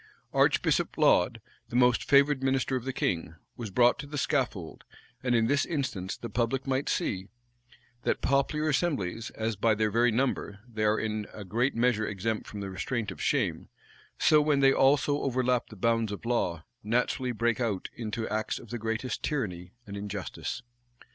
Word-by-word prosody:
Archbishop - - +2
Laud, - - +4 0.3
the - - -7
most 125 -1 +4
favored 140 0 +5
minister 135 0 +1
of 125 -1 -3
the 135 - -1
king, 85 -9 -2 0.2
was 115 -3 -5
brought 120 +5 +4
to 145 - -6
the 145 0 -5
scaffold; 125 - -1 0.4
and 125 -1 +1
in 115 -1 +3
this 140 +4 +2
instance 130 - -3
the 120 - -6
public 125 +3 -1
might 135 0 0
see, 95 -1 -1 0.7
that - - 0
popular 140 +3 +1
assemblies, 135 - -1
as, 110 0 -1
by 110 +2 +2
their 110 0 +1
very 120 +2 +3
number, 115 -4 -1
they 110 -3 -3
are 105 +1 +3
in 110 -1 -2
a 105 - -7
great 120 +8 0
measure 115 -2 +2
exempt 105 +2 -2
from 105 - -7
the 100 -1 -5
restraint 105 +4 -2
of - - -9
shame, - - 0 0.5
so 155 -1 +5
when 145 -2 +2
they 135 0 +6
also 145 +1 +3
overleap 125 -2 +1
the 110 - -11
bounds 115 +1 +1
of 100 - -7
law, 90 -9 0 0.2
naturally 125 +3 0
break 120 +1 0
out 105 -6 -1
into 110 0 -3
acts 110 0 -2
of 120 - -11
the 120 - -3
greatest 115 +2 -2
tyranny 90 - -3
and 100 - -7
injustice. 100 +4 -5
115 Hz, 175 wpm, -29 LUFS, 105-135 Hz, 0.7 s, they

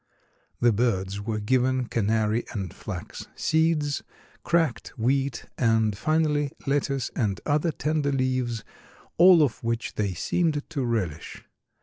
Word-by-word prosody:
The 120 -1 +4
birds 100 -3 0
were 110 0 -2
given 130 +3 +1
canary 110 0 0
and 95 -5 -4
flax - - -7
seeds, 160 -2 +1 0.4
cracked 160 -11 +1
wheat 135 +2 0
and 110 -3 +2
finally 150 +2 +1
lettuce 140 -1 0
and 100 -6 0
other 150 +3 +1
tender 150 -1 -1
leaves, 130 -4 -1 0.6
all 175 -2 +8
of 130 -5 -2
which 115 0 -2
they 100 -3 -1
seemed 155 - 0
to 140 -4 -1
relish. 95 -10 -3
125 Hz, 120 wpm, -26 LUFS, 110-145 Hz, 0.6 s, all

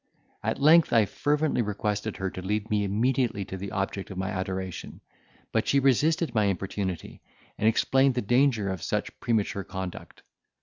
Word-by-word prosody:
At - - -2
length, 155 +4 +6
I 115 -3 +5
fervently 145 +4 0
requested 105 0 -2
her 95 -1 -2
to 95 - -7
lead 105 +3 -2
me 105 -1 +2
immediately 110 +1 0
to 95 - -6
the 100 +1 -5
object 95 0 -3
of 95 - -8
my 95 0 -2
adoration; 95 -1 -4 0.5
but - - 0
she 140 - +4
resisted 150 +5 +2
my 110 -2 +3
importunity, 95 -1 -3 0.4
and 110 - +2
explained 135 +3 +3
the 125 - 0
danger 120 -2 +2
of 95 -3 -5
such - - -3
premature 105 -3 0
conduct. 95 -1 -7
105 Hz, 165 wpm, -27 LUFS, 95-130 Hz, 0.5 s, length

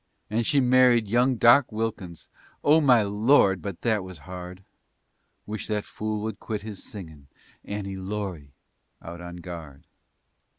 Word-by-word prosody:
And 115 +1 0
she 145 - +3
married 125 -3 +4
young 125 +4 +2
Doc 120 +3 +5
Wilkins 105 -6 -4 0.4
Oh 155 +2 +5
my 125 -6 +5
Lord! 100 - +3
but 100 -2 -6
that 110 -4 +1
was 95 -2 -9
hard! 90 +1 -8 0.8
Wish 105 0 -5
that 105 -1 -2
fool 110 0 -4
would 110 -2 -4
quit 105 -3 -5
his 105 -3 -8
singin' 80 -9 -10 0.4
"Annie 100 -2 -5
Laurie" 95 -7 -5 0.5
out 85 +1 -8
on 85 0 -8
guard! 85 -6 -9
105 Hz, 140 wpm, -26 LUFS, 90-115 Hz, 0.8 s, Doc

